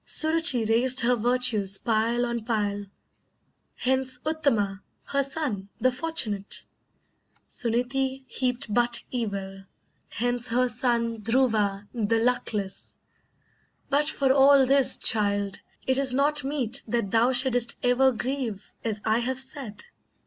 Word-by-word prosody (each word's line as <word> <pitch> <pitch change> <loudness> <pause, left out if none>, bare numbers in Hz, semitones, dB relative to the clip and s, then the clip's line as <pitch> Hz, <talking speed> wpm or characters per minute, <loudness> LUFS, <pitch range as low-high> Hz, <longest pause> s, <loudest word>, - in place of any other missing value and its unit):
Suruchee 315 -7 +1
raised 250 +3 +2
her 245 +1 +3
virtues 235 -4 +3
pile 230 +2 0
on 235 -2 -4
pile, 205 -3 -2 0.9
Hence 260 0 0
Uttama 230 -11 -1 0.2
her 280 - 0
son, 265 -9 -4
the 255 - +2
fortunate! 250 -9 -1 0.8
Suneetee 260 +3 -2
heaped 250 -3 -2
but 240 0 +2
evil, 195 -5 -5 0.5
hence 245 +1 -1
her 250 +2 +1
son 235 -1 -1
Dhruva 215 -4 0
the 230 -1 0
luckless! 225 -4 -2 0.9
But 290 +2 +3
for 270 -3 +2
all 275 0 +5
this, 270 0 +5
child, 205 -2 0 0.3
It 260 +1 +1
is 265 -2 +2
not 290 +2 +2
meet 270 -2 +1
that 220 -3 -2
thou 235 +3 +3
shouldst 245 -2 +3
ever 250 +2 +3
grieve 240 -4 -5
As 215 -2 -4
I 220 +1 +2
have 255 +2 -2
said. 265 -5 -6
245 Hz, 120 wpm, -25 LUFS, 220-265 Hz, 0.9 s, all